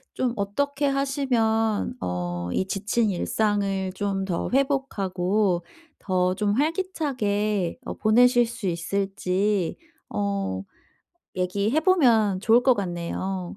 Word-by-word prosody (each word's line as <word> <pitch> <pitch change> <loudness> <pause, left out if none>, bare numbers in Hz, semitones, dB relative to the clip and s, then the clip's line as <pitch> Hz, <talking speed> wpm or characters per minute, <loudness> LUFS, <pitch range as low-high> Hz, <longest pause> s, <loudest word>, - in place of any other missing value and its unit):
좀 250 -2 0
어떻게 280 +8 -1
하시면 245 -6 +1
어 90 -1 -3
이 190 - 0
지친 210 +2 0
일상을 195 0 0
좀 195 -1 -2
더 180 -3 -2
회복하고 200 - +1 0.4
더 185 -1 +1
좀 205 0 0
활기차게 250 - -1
어 - - -4
보내실 245 +2 +4
수 235 -3 -7
있을지 195 +1 -1 0.3
어 200 - -2 0.7
얘기해 200 - +1
보면 235 - +4
좋을 230 +3 +4
것 255 -1 +5
같네요. 185 0 -4
205 Hz, 205 characters per minute, -25 LUFS, 185-245 Hz, 0.7 s, 것